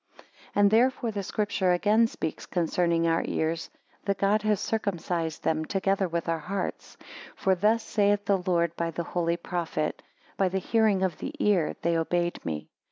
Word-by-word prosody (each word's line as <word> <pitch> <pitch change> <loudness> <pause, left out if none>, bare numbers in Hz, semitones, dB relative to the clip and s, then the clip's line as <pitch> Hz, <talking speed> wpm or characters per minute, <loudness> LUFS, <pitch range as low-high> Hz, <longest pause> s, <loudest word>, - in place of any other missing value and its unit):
AND 205 0 +5
therefore 240 +1 +3
the 205 -1 -3
Scripture 195 -2 0
again 215 +5 +4
speaks 160 -8 -5
concerning 170 -1 +1
our 165 0 +2
ears, 160 +1 -1 0.4
that 200 -1 0
God 205 +2 +2
has 210 -2 +1
circumcised 175 -6 -2
them, 160 0 +1
together 195 +2 0
with 170 0 -3
our 165 -1 0
hearts. 190 +4 -4 0.4
For 190 - +2
thus 215 +5 +2
saith 205 -1 +1
the 200 -2 +2
Lord 170 -2 0
by 170 0 -1
the 170 +1 -3
holy 170 0 -1
prophet: 170 -3 -3 0.4
By 190 -1 +2
the 190 - -1
hearing 210 -1 +2
of 185 -4 -1
the - - -5
ear 190 -7 +2
they 170 0 +2
obeyed 175 +1 -1
me. 75 -2 -4
180 Hz, 165 wpm, -27 LUFS, 170-205 Hz, 0.4 s, AND